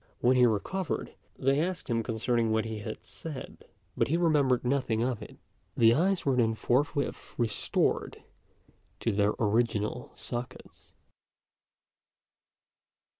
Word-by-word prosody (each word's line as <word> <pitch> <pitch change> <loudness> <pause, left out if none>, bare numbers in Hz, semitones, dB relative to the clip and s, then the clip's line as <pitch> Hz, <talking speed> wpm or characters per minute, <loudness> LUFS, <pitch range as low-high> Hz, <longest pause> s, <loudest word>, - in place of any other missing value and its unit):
When 125 +2 +4
he 125 -1 +6
recovered, 155 - -2 0.2
they 135 +2 +2
asked 180 +1 -3
him 115 -2 +1
concerning 115 +1 0
what 110 0 +1
he 110 -1 -4
had 110 +1 -7
said; 155 -5 -8 0.3
but - - +2
he 160 - +1
remembered 145 -8 +3
nothing 125 -4 +1
of 125 -3 -1
it. - - -10 0.4
The 115 0 +6
eyes 185 +7 +1
were 135 -2 +3
then 115 -2 +2
forthwith 140 +5 -1
restored 115 -3 0 0.8
to 115 - +1
their 100 +1 +2
original 110 +1 0
sockets. 125 +1 -7
120 Hz, 125 wpm, -29 LUFS, 110-140 Hz, 0.8 s, he